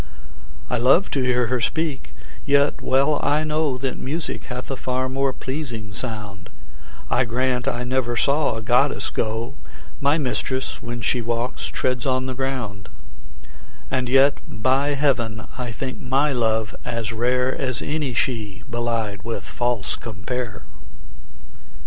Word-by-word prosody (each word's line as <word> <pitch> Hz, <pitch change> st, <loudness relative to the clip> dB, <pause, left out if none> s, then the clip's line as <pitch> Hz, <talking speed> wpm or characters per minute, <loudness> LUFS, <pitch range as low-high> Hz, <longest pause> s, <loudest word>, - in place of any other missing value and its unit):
I 125 Hz, -, 0 dB
love 135 Hz, +10 st, +5 dB
to 140 Hz, -, +1 dB
hear 125 Hz, -1 st, +3 dB
her 125 Hz, +1 st, 0 dB
speak, 155 Hz, +2 st, -1 dB, 0.3 s
yet 140 Hz, 0 st, +3 dB
well 140 Hz, +3 st, +3 dB
I 150 Hz, +2 st, +3 dB
know 155 Hz, -3 st, +1 dB
That 130 Hz, 0 st, -2 dB
music 155 Hz, +5 st, -3 dB
hath 125 Hz, +1 st, -5 dB
a -, -, 0 dB
far 130 Hz, 0 st, -1 dB
more 135 Hz, +1 st, +1 dB
pleasing 130 Hz, -6 st, -5 dB
sound; 105 Hz, -4 st, -6 dB, 0.6 s
I 130 Hz, -, +4 dB
grant 125 Hz, +1 st, 0 dB
I 120 Hz, 0 st, 0 dB
never 125 Hz, -1 st, 0 dB
saw 140 Hz, -1 st, +3 dB
a 110 Hz, -, -4 dB
goddess 125 Hz, +5 st, +2 dB
go; 115 Hz, +3 st, -1 dB, 0.5 s
My 140 Hz, +3 st, +3 dB
mistress, 130 Hz, -2 st, -2 dB
when 120 Hz, 0 st, -4 dB
she 120 Hz, +3 st, +1 dB
walks, 115 Hz, +2 st, -2 dB
treads 125 Hz, 0 st, -1 dB
on 130 Hz, 0 st, +2 dB
the 130 Hz, -, -2 dB
ground: 125 Hz, -7 st, -3 dB, 1.0 s
And 130 Hz, -2 st, 0 dB
yet, 135 Hz, +2 st, +5 dB
by 135 Hz, +6 st, +2 dB
heaven, 120 Hz, -6 st, +1 dB
I 125 Hz, -2 st, -3 dB
think 130 Hz, +3 st, -4 dB
my 135 Hz, +3 st, +2 dB
love 110 Hz, -3 st, +1 dB
as 115 Hz, -2 st, -2 dB
rare 125 Hz, +3 st, +2 dB
As 130 Hz, -3 st, -1 dB
any 145 Hz, -4 st, -1 dB
she 110 Hz, -6 st, -1 dB
belied 115 Hz, -4 st, -1 dB
with 115 Hz, +2 st, -4 dB
false 120 Hz, -6 st, -1 dB
compare. 115 Hz, +1 st, -4 dB
125 Hz, 145 wpm, -23 LUFS, 115-135 Hz, 1.0 s, love